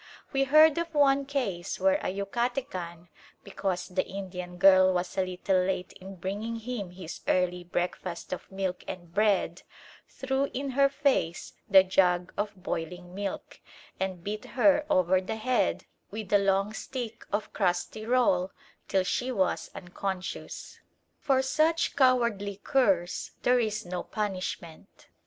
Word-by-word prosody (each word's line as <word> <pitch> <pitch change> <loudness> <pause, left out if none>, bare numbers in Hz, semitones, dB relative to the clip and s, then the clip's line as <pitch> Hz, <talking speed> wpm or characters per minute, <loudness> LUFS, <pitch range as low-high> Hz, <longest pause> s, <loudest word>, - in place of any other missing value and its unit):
We 270 0 +2
heard 310 +3 +6
of 335 -2 -4
one 280 -1 +4
case 220 -12 -2
where 290 +1 +3
a - - -1
Yucatecan, 195 -5 -3 0.3
because 190 -2 -3
the 185 0 0
Indian 180 -2 -7
girl 185 0 +7
was 180 +1 -2
a 190 - +2
little 185 +1 0
late 185 -1 -2
in 190 +1 -10
bringing 205 +6 -4
him 225 -4 -5
his 180 -2 -9
early 180 -1 +1
breakfast 175 0 -3
of 185 - -8
milk 190 -1 -3
and 175 -2 -8
bread, 200 -4 +2 0.5
threw 265 +1 -1
in 275 +1 -2
her 275 +1 +4
face 275 - 0 0.2
the 190 -1 +8
jug 180 -1 +2
of 205 0 -2
boiling 180 -1 -5
milk, 200 0 -5 0.4
and 190 -2 -3
beat 210 +2 -4
her 295 +3 +4
over 185 - +3
the 190 +4 -4
head 250 +3 0 0.2
with 215 -1 -6
the 205 - +5
long 195 +1 +1
stick 235 -1 -6
of 205 +1 -2
crusty 185 +2 -1
roll 220 -6 +2 0.4
till 190 -1 +2
she 250 +7 -1
was 190 -6 0
unconscious. 185 +1 -5 0.4
For 265 -2 +2
such 315 +5 +1
cowardly 235 -7 +2
curs 195 -10 +1
there 250 0 +4
is 215 -3 -1
no 175 0 -3
punishment. 185 -5 -5
195 Hz, 140 wpm, -28 LUFS, 180-245 Hz, 0.5 s, the